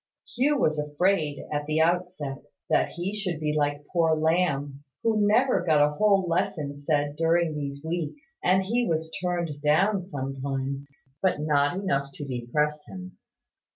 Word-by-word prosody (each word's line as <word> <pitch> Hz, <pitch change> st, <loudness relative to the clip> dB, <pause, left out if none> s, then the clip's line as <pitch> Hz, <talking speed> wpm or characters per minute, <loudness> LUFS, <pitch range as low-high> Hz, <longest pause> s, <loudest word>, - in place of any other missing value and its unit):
Hugh 285 Hz, +4 st, +3 dB
was 155 Hz, -, +1 dB
afraid, 150 Hz, 0 st, 0 dB
at 145 Hz, 0 st, -2 dB
the 155 Hz, +1 st, +1 dB
outset, 165 Hz, -4 st, 0 dB, 0.3 s
that -, -, +3 dB
he 175 Hz, +4 st, -3 dB
should 185 Hz, -6 st, -2 dB
be 150 Hz, -1 st, -1 dB
like 145 Hz, -1 st, 0 dB
poor 165 Hz, -2 st, +3 dB
Lamb, 155 Hz, -4 st, 0 dB, 0.2 s
who 215 Hz, -2 st, +3 dB
never 245 Hz, -1 st, +3 dB
got 155 Hz, -4 st, +3 dB
a 150 Hz, -, -4 dB
whole 195 Hz, +1 st, +3 dB
lesson 150 Hz, -4 st, -1 dB
said 145 Hz, 0 st, 0 dB
during 165 Hz, +1 st, +2 dB
these 140 Hz, 0 st, -5 dB
weeks: 175 Hz, -, -5 dB
and 185 Hz, +2 st, +4 dB
he 235 Hz, +5 st, 0 dB
was 160 Hz, -1 st, -1 dB
turned 170 Hz, -5 st, -2 dB
down 185 Hz, +7 st, +3 dB
sometimes; 135 Hz, -1 st, -4 dB, 0.3 s
but 185 Hz, -5 st, +2 dB
not 145 Hz, -1 st, +2 dB
often 190 Hz, +2 st, -4 dB
enough 140 Hz, -7 st, 0 dB
to 145 Hz, -, -7 dB
depress 150 Hz, +4 st, -1 dB
him. 185 Hz, -1 st, -10 dB
155 Hz, 155 wpm, -26 LUFS, 145-185 Hz, 0.3 s, and